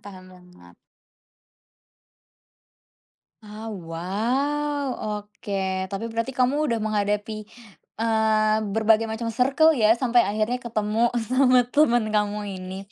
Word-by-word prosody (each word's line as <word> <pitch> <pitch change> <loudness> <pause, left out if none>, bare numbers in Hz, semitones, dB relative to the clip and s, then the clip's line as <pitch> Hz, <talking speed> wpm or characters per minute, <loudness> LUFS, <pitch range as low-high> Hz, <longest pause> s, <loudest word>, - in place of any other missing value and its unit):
Paham 185 -2 -12
banget. 180 - -18 2.7
Oh 215 +1 -8 0.2
wow. 270 - -1 0.2
Oke, 200 -3 -4
tapi 200 +3 -4
berarti 230 +3 -2
kamu 260 +3 +1
udah 230 - +1
menghadapi, 210 +1 -1 0.6
eee, 220 -1 +2 0.2
berbagai 225 0 +3
macam 230 +1 -3
circle 280 +7 +4
ya, 225 -3 +3
sampai 240 -1 +3
akhirnya 220 +4 -1
ketemu 225 0 0 0.2
sama 255 0 +4
temen 240 -6 +3
kamu 210 0 +1 0.2
ini. 185 0 -7
220 Hz, 100 wpm, -24 LUFS, 205-245 Hz, 2.7 s, circle